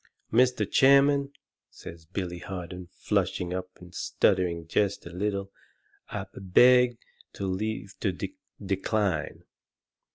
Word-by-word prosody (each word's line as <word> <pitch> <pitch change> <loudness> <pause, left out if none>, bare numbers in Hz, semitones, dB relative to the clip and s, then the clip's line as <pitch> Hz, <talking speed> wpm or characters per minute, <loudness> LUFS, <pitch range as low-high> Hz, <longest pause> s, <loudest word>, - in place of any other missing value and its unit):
"Mr. 125 -3 +3
Chairman," 140 +2 +4 0.4
says 80 -1 -11
Billy 90 -1 -4
Harden, 90 -1 -7
flushing 90 0 -1
up 90 0 -4
and 90 0 -14
stuttering 90 -4 +1
jest 100 +4 0
a 85 - -8
little, 100 +1 -2 0.6
"I - - -4
b - - -9
beg 125 +5 +5 0.4
leave 100 +1 -3
to 100 - 0
d 90 - -4
d - - -28 0.3
decline." 95 -4 -1
95 Hz, 120 wpm, -27 LUFS, 90-110 Hz, 0.6 s, beg